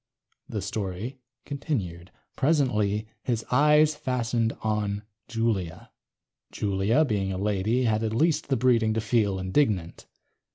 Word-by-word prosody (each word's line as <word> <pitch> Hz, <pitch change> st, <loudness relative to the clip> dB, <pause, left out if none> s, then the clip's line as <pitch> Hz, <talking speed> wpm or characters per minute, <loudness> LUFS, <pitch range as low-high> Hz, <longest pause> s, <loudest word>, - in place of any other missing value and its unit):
The -, -, -3 dB
story 105 Hz, +6 st, -4 dB, 0.3 s
continued:... 100 Hz, -, -4 dB, 0.3 s
presently 110 Hz, -8 st, +1 dB
his 115 Hz, -3 st, -2 dB
eyes 150 Hz, +3 st, +5 dB
fastened 120 Hz, -5 st, -1 dB
on 105 Hz, -1 st, -1 dB, 0.2 s
Julia. 110 Hz, -7 st, -2 dB, 0.6 s
Julia, 105 Hz, +8 st, +1 dB
being 100 Hz, -6 st, -1 dB
a 95 Hz, -, -3 dB
lady, 105 Hz, +5 st, +1 dB
had 110 Hz, -2 st, +1 dB
at 110 Hz, 0 st, -1 dB
least 160 Hz, +5 st, +2 dB
the 135 Hz, -2 st, +1 dB
breeding 115 Hz, -3 st, +3 dB
to -, -, +1 dB
feel 105 Hz, -3 st, +1 dB
indignant. 95 Hz, -, 0 dB
110 Hz, 120 wpm, -26 LUFS, 100-130 Hz, 0.6 s, eyes